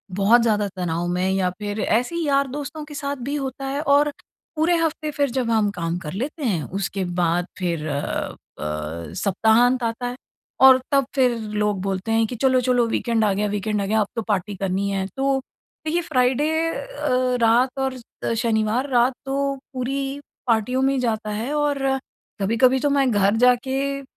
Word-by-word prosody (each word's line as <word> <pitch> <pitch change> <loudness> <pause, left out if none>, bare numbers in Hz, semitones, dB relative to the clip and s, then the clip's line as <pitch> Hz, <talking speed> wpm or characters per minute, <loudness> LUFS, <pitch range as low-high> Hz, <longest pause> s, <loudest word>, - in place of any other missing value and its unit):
बहुत 215 +5 +5
ज़्यादा 210 -3 +2
तनाव 175 -1 -1
में 180 +2 0
या 190 -1 +1
फिर 205 +1 -4
ऐसे 245 +10 +1
ही 340 -1 -1
यार-दोस्तों 280 +2 -1
के 300 - -11
साथ 285 -1 -3
भी 285 - -1
होता 270 -1 -4
है 275 +2 -2
और 290 0 +3 0.5
पूरे 330 +3 +3
हफ़्ते 315 -2 -1
फिर 285 -2 0
जब 250 -2 -1
हम 215 -2 +3
काम 170 -2 -3
कर 150 -4 -7
लेते 280 - -4
हैं। 180 -10 0 0.2
उसके 195 0 -2 0.2
बाद 175 +1 +1
फिर 170 -4 -2
अ 145 -1 -3 0.2
अ, 75 +2 -4
सप्ताहांत 225 +5 +3
आता 230 +2 -2
है। 245 - -4 0.5
और 260 -1 +9
तब 275 -2 +3
फिर 250 -3 +3 0.2
लोग 205 -3 0
बोलते 195 +2 -2
हैं 225 0 +3
कि 245 - -5
चलो 255 +1 +3
चलो 245 -2 +2
वीकेंड 230 -1 0
आ 205 - +3
गया 205 +2 0
वीकेंड 210 0 -1
आ - - -1
गया, 220 +2 +1
अब 205 - 0
तो 230 - -1
पार्टी 200 -1 -1
करनी 195 +1 -1
है। 195 -1 -1
तो 270 0 +2 0.5
देखिए 335 +3 +1
फ्राइडे 265 -1 +1 0.2
अ, - - -4 0.3
रात 245 +4 +3
और 265 -1 -1 0.4
शनिवार 225 +3 0
रात 245 +1 +4
तो 275 +1 -1 0.2
पूरी 270 +2 -2 0.3
पार्टियों 235 +3 +1
में 270 +1 +3
ही 265 - 0
जाता 220 -3 -1
है 230 +8 -3
और 295 -1 +1 0.6
कभी-कभी 250 +6 +3
तो 290 - +1
मैं 275 -2 +3
घर 205 0 +3
जाके 255 +2 +2 0.2
अ, - - -13
240 Hz, 185 wpm, -23 LUFS, 200-275 Hz, 0.6 s, और